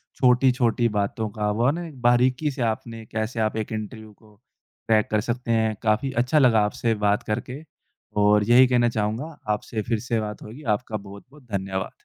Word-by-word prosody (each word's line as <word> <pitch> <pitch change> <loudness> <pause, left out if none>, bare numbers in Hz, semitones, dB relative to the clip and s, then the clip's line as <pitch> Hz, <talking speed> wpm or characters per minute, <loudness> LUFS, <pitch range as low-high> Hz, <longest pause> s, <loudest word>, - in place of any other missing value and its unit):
छोटी-छोटी 125 -2 +3
बातों 105 +1 -2
का 105 0 -2
वो 115 +3 0
है 140 - +4
ना 175 0 -5
एक 140 -5 -12
बारीकी 125 +4 +3
से 130 - -6
आपने 115 0 -3
कैसे 110 +2 -4
आप 110 0 0
एक 110 - -4
इंटरव्यू 110 0 -6
को 105 +1 -22
क्रैक 110 -2 -3
कर 105 -1 +2
सकते 120 +1 -3
हैं। 110 -1 +1
काफ़ी 110 +5 +1
अच्छा 150 +5 +2
लगा 120 -5 +5
आपसे 115 +2 -1
बात 105 0 +2
करके 125 +6 -4 0.6
और 105 0 +4
यही 125 +2 +7
कहना 120 -1 +3
चाहूँगा 115 +8 -3 0.2
आपसे 110 +1 -4
फिर 115 -2 +1
से 115 0 -1
बात 105 -1 -6
होगी। 120 +8 -10
आपका 110 0 -5
बहुत-बहुत 105 +8 -13
धन्यवाद। 95 -1 -3
115 Hz, 185 wpm, -24 LUFS, 105-125 Hz, 0.6 s, यही